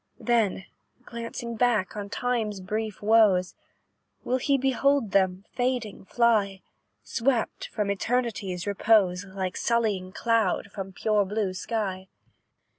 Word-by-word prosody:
"Then, 220 -6 +1 0.4
glancing 235 0 -6
back 225 -6 +1
on 205 -1 -5
Time's 225 -3 -1
brief 215 +2 -4
woes, 205 -4 +4 0.7
Will 255 +1 0
he 275 +2 +2
behold 270 -2 +1
them, 190 0 +1
fading, 245 -6 -2
fly; 205 -4 +1 0.4
Swept 240 -1 -1
from 205 -2 -2
Eternity's 200 -4 -2
repose, 200 -2 +2
Like 190 -1 -4
sullying 215 -6 0
cloud 220 -2 0
from 195 -2 -6
pure 210 +2 +1
blue 200 -1 -2
sky? 190 -1 -3
210 Hz, 115 wpm, -26 LUFS, 190-235 Hz, 0.7 s, woes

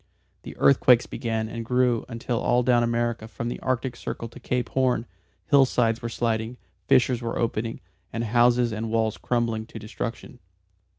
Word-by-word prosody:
The - - -10
earthquakes 125 -3 +5
began 110 -1 -3
and 115 +1 -5
grew 125 0 +1
until 115 0 -3
all 125 +1 +2
down 120 -1 +4
America 120 -1 -1
from 115 +1 -5
the - - -5
Arctic 130 -1 -2
Circle 115 -1 -6
to 125 - -13
Cape 125 -1 -2
Horn, 130 -3 +1 0.4
hillsides 125 -5 +3
were 115 - -3
sliding, 115 0 -2 0.3
fissures 125 -1 +3
were 115 -1 -3
opening, 115 0 -2 0.3
and 115 - -3
houses 120 +1 +3
and 110 +1 -3
walls 110 -1 0
crumbling 115 -2 -1
to 115 - -10
destruction. 115 +3 -6
120 Hz, 160 wpm, -25 LUFS, 115-125 Hz, 0.4 s, earthquakes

